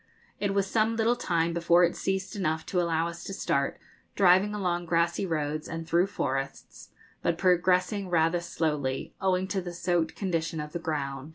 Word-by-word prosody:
It 200 -1 -1
was 200 -1 +2
some 220 +2 +1
little 225 +2 +2
time 170 -7 0
before 170 +1 +4
it 175 - +2
ceased 190 +2 -2
enough 160 -5 -1
to 180 - 0
allow 165 -1 +1
us 170 0 -7
to 195 - -5
start, 140 -7 0 0.4
driving 195 +2 +4
along 175 -3 -1
grassy 170 +3 +1
roads 155 -2 -2
and 165 0 -6
through 175 +3 +3
forests, 135 -8 -4 0.3
but 170 - 0
progressing 185 +2 +2
rather 165 0 +2
slowly, 150 -6 -2
owing 190 -1 +1
to 195 -1 -1
the 175 -1 -6
soaked 175 -2 0
condition 165 -4 -2
of 150 0 -5
the 170 - -4
ground. 140 -3 -3
175 Hz, 175 wpm, -28 LUFS, 160-190 Hz, 0.4 s, before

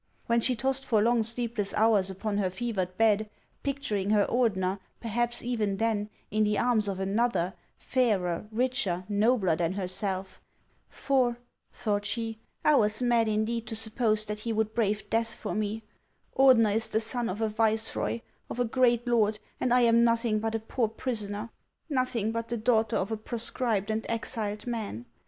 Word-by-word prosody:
When 235 0 +2
she 250 +2 +2
tossed 265 +3 +1
for 230 -5 +2
long 235 +2 +3
sleepless 230 -2 -2
hours 215 -3 +3
upon 200 +2 -2
her 190 -2 +1
fevered 185 -3 -3
bed, 215 -1 +3 0.3
picturing 265 -9 -2
her 210 -1 +4
Ordener, 195 -6 +1 0.2
perhaps 240 +1 -2
even 220 -5 -1
then, 215 -2 0 0.2
in 215 +1 +2
the 210 -1 +1
arms 235 -4 +2
of 195 -1 -3
another, 195 -2 0 0.2
fairer, 210 -8 0
richer, 230 -6 0
nobler 205 -3 +2
than 170 +2 0
herself? 190 0 -3 0.5
For, 255 -3 +1 0.3
thought 205 -2 -1
she, 225 +1 -3 0.3
I 300 - +6
was 215 +2 +2
mad 235 -2 +3
indeed 220 +2 -1
to 225 - -4
suppose 220 -1 0
that 210 0 -4
he 230 +2 -3
would 220 0 0
brave 215 -2 0
death 225 0 0
for - - -5
me. 215 +1 -2 0.5
Ordener 250 -6 +6
is 225 0 +1
the 220 - +1
son 235 +1 -1
of 195 - -4
a 220 - +1
viceroy, 220 +1 0 0.3
of - - -5
a 245 - +3
great 240 0 +2
lord, 220 -3 +2 0.2
and 250 - 0
I 250 0 +5
am 235 0 +5
nothing 230 -2 +2
but 225 +1 -2
a - - 0
poor 225 +1 -1
prisoner, 215 -2 -4 0.4
nothing 255 -5 0
but 230 0 -3
the 235 - -2
daughter 220 -1 +2
of 195 - -2
a 220 - -1
proscribed 220 -2 -1
and 220 +1 -1
exiled 215 -2 -2
man. 215 - -4
220 Hz, 170 wpm, -28 LUFS, 210-235 Hz, 0.5 s, I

